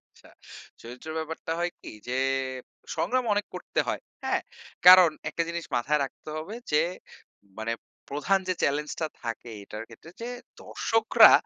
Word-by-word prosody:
আচ্ছা। - - -22 0.5
চরিত্রের 125 +7 -8
ব্যাপারটা 160 0 -4
হয় 175 0 +1
কি? - - -8 0.2
যে, 125 +1 0 0.8
সংগ্রাম 255 0 +1
অনেক 205 0 +1
করতে - - -1
হয়, - - -1 0.2
হ্যাঁ? - - +1 0.5
কারণ 180 -2 +11 0.2
একটা 165 +2 -1
জিনিস 170 0 -3
মাথায় 145 +5 +2
রাখতে 135 - -10
হবে 160 +7 -5 0.2
যে, 150 +1 +5 0.8
মানে 110 +1 -1 0.4
প্রধান 150 +8 +2
যে 185 - +2
চ্যালেঞ্জটা 150 +3 0 0.2
থাকে 115 +1 -4
এটার 105 +2 -7
ক্ষেত্রে 120 +8 -13
যে, 235 - -3 0.3
দর্শকরা 225 0 +6
155 Hz, 140 wpm, -28 LUFS, 130-180 Hz, 0.8 s, কারণ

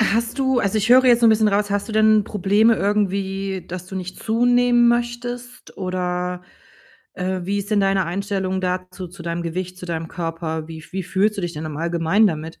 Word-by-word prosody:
hast 230 +3 +1
du 265 -2 +2
also, 200 +2 0
ich 215 +3 0
höre 260 +1 +7
jetzt 240 -1 +5
so 235 - +5
'n - - +7
bisschen 220 -1 +4
raus, 205 0 0
hast 205 +3 -1
du - - -5
denn 215 -1 +4
Probleme 210 +3 +2
irgendwie, 195 -2 -1
dass 180 +1 -7
du 190 0 -7
nicht 185 0 -7
zunehmen 240 +1 +3
möchtest 240 +1 -2
oder, 180 -1 -3 0.7
äh, 185 0 -2
wie 200 +2 -1
ist 200 +1 -5
denn 210 -2 +3
deine 195 -1 +2
Einstellung 190 0 -2
dazu, 185 0 -4
zu 175 0 -12
deinem 170 0 -3
Gewicht, 180 +2 -4
zu 180 - -8
deinem 165 -1 -3
Körper? 165 -2 -4
Wie 160 -1 -8
f 160 - -15
wie 190 - -2
fühlst 205 +4 +1
du - - -2
dich 175 - -3
denn 150 - -5
im 155 -2 -5
Allgemeinen 170 +5 +2
damit? 160 -1 -6
195 Hz, 210 wpm, -21 LUFS, 180-220 Hz, 0.7 s, höre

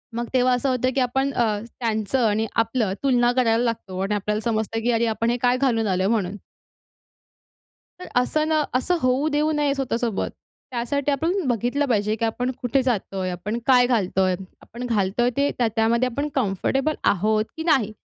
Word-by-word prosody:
मग 235 0 -2
तेव्हा 255 0 +3
असं 255 +2 0
होतं, 255 0 +1
की - - +2
आपण 265 +3 0
अ, 240 - +2 0.4
त्यांचं 225 +1 0
आणि 220 +2 0 0.2
आपलं 225 -4 -1
तुलना 245 -3 +3
करायला 235 -2 +2
लागतो 205 -5 -3
आणि 205 +1 0
आपल्याला 210 +2 -1
समजतं, 225 -1 -1
की 245 - +2
अरे 230 0 +2
आपण 230 +1 -1
हे 240 - +1
काय 250 0 +3
घालून 230 -5 +1
आलोय 190 0 +1
म्हणून. 205 -4 0 1.6
तर 365 - -8
असं 305 +4 0
न 310 -1 +2
असं 355 +8 +1
होऊ 255 +4 +2
देऊ 300 +1 +1
नये 295 -2 +1
स्वतःसोबत. 235 -5 -1 0.4
त्यासाठी 280 +4 -1
आपण 325 +6 0
बघितलं 245 +5 0
पाहिजे, 215 -2 +1
की 230 - -1
आपण 245 +3 -1
कुठे 260 +2 +1
जातोय, 195 -6 -1
आपण 205 +6 -4
काय 250 -2 +6
घालतोय, 190 -5 +1 0.3
आपण 240 +2 -8
घालतोय 225 +1 +1
ते 285 +1 +2
त्या 240 -2 +2
त्यामध्ये 235 +3 +2
आपण 285 +3 -1
कम्फर्टेबल 265 +6 0 0.2
आहोत 215 +3 +1
की 320 - -3
नाही? 265 -11 +2
240 Hz, 175 wpm, -23 LUFS, 215-265 Hz, 1.6 s, काय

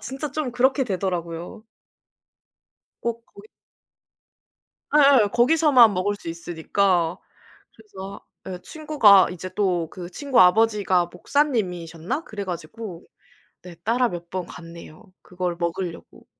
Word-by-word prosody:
진짜 275 +3 -6
좀 305 -4 -2
그렇게 265 +3 +2
되더라고요. 180 -1 -4 1.4
꼭 235 0 -4
거기 200 +2 -16 1.5
예예. 275 -7 +6
거기서만 250 -2 +5
먹을 200 +3 -1
수 200 - -13
있으니까. 170 +1 0 0.6
그래서 200 -3 -10 0.2
예 185 -1 -5
친구가 280 - +4
이제 180 +1 -7
또 180 -5 0
그 180 -1 -9
친구 280 +4 +1
아버지가 190 -2 +4
목사님이셨나? 180 - -2
그래 205 -2 -6
가지고 180 +2 -7 0.6
네 180 -1 -11
따라 245 +3 +2
몇 175 -2 -8
번 185 -2 -4
갔네요. 165 -1 -12 0.2
그걸 180 -1 -4
먹으려고. 170 0 -5
195 Hz, 255 characters per minute, -23 LUFS, 175-235 Hz, 1.5 s, 예예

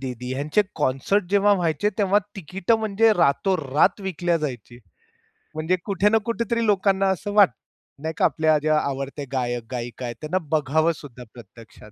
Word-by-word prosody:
दीदी 125 -1 -5
ह्यांचे 150 +9 +1
कॉन्सर्ट 150 +8 0
जेव्हा 205 0 +4
व्हायचे 175 0 +1
तेव्हा 200 -1 +3 0.2
तिकीट 190 +3 -2
म्हणजे 220 0 +3
रातोरात 160 -2 +2
विकल्या 175 -2 -1
जायची. 125 -6 -6 0.8
म्हणजे 160 +4 0
कुठे 200 0 +2
ना 220 - +4
कुठेतरी 230 0 -1
लोकांना 195 -1 +2
असं 190 +2 -2
वाटतं 195 - +4 0.4
नाही 160 0 -2
का - - +3
आपल्या 155 -1 +2
आवडत्या 140 +1 -4
गायक-गायिका 120 -1 -4
आहेत 120 -1 -5
त्यांना 155 +4 -1
बघावं 155 +2 +2
सुद्धा 125 -5 -11
प्रत्यक्षात. 115 -2 -15
160 Hz, 140 wpm, -23 LUFS, 135-195 Hz, 0.8 s, जेव्हा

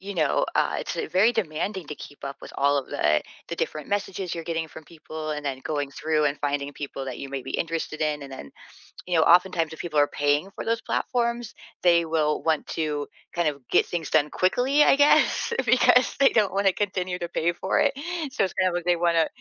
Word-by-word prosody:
you 200 +1 -7
know, 155 -3 +2
uh, - - +2
it's - - -5 0.2
very 200 +6 +5
demanding 190 -1 -2
to 150 - -6
keep 145 - -11
up 140 0 -5
with - - -10
all 140 +1 +3
of 135 - -2
the 75 0 +1 0.3
the - - -3
different 150 -2 -3
messages 195 -3 -2
you're 165 - -5
getting 165 -1 -3
from 160 0 -12
people 155 -1 -7
and 150 -1 -4
then 135 -1 -3
going 145 -2 -2
through 155 0 0
and 145 0 +1
finding 145 0 -2
people 140 -1 -6
that 130 -2 -6
you 140 - -6
may 135 0 -4
be - - -7
interested 165 -1 -3
in. 150 -1 0
And 135 -1 -9
then, 70 - -9 0.6
you 180 - -1
know, 160 - +5
oftentimes 170 -2 +3
if 160 - -11
people 155 -4 -1
are 145 - +5
paying 145 +7 0
for - - -5
those 230 0 0
platforms, 235 -2 -1 0.3
they 170 -1 +5
will 155 -2 0
want 160 -2 +1
to 150 -2 -2 0.3
kind 170 -3 +2
of 140 -1 -7
get - - +4
things 170 -3 -3
done 150 -1 +3
quickly, 255 - +2
I - - +6
guess, 290 +10 +3
because 250 +1 +4
they 275 -1 +6
don't 210 -4 +2
wanna 195 0 +3
continue 185 -2 -2
to 175 - -3
pay 170 +1 0
for 185 +2 -1
it, - - +3 0.4
so, - - 0
it's - - -6
kinda 185 -1 +1
like 175 -1 -3
they 175 -1 +3
wanna, 170 -1 +2
165 Hz, 225 wpm, -25 LUFS, 150-185 Hz, 0.6 s, I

